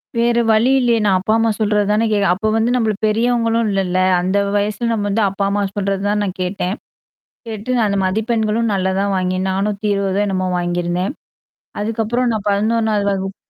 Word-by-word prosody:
வேற 235 0 +2
வழி 220 +4 +3
இல்லையே 235 -2 +2
நான் 190 -2 +3
அப்பா 215 +4 0
அம்மா 225 0 +2
சொல்றது 210 -1 +1
தானே 220 +2 +2
கேட்கணும் 205 -1 +2
அப்ப 215 +4 -1
வந்து 225 +2 +1
நம்மள 220 -3 +1
பெரியவங்களும் 230 0 +1
இல்லல்ல. 185 -2 -1 0.2
அந்த 190 +3 0 0.2
வயசுல 210 +3 -1
நம்ம 210 -2 -1
வந்து 215 +2 +1
அப்பா 195 +1 -3
அம்மா 205 0 0
சொல்றது 195 -1 -1
தான் 210 0 0
நான் 190 -2 -4
கேட்டேன். 180 +1 -2 0.7
கேட்டு 225 +3 -3
நான் 220 -3 +2
அந்த 200 0 0
மதிப்பெண்களும் 220 +2 0
நல்லா 190 -1 0
தான் 200 0 0
வாங்கினேன். 185 0 -1
420 200 0 -1
என்னமோ 185 -2 -1
வாங்கியிருந்தேன். 175 +4 -1 0.7
அதுக்கப்பறம் 230 +3 -1
நான் 210 -1 -3
11வது 215 0 +1
வகுப்பு. 195 0 -3
205 Hz, 170 wpm, -18 LUFS, 195-225 Hz, 0.7 s, வழி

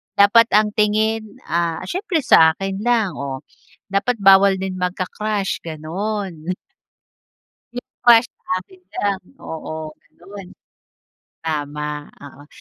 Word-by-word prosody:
Dapat 220 +3 +6
ang 210 0 +4
tingin, 215 +1 0 0.2
ah, 170 -1 0
siyempre 360 - -2
sa 160 -8 +6
akin 195 +1 -4
lang, 225 -4 +1
oh. 135 -1 -5 0.5
Dapat 200 +5 +1
bawal 195 0 +7
din 190 -1 -4
magka-crush 190 +2 -2
gano'n. 180 +2 -4 1.2
Yung 245 - -8 0.2
crush 235 0 +7 0.3
akin 185 0 -15
ka - - -12
lang. 200 -2 0 0.2
Oo 155 -1 -7 0.2
gano'n. 195 +1 -11 1.0
Tama 150 -1 -3 0.3
oo. 145 0 -13
195 Hz, 110 wpm, -20 LUFS, 165-215 Hz, 1.2 s, bawal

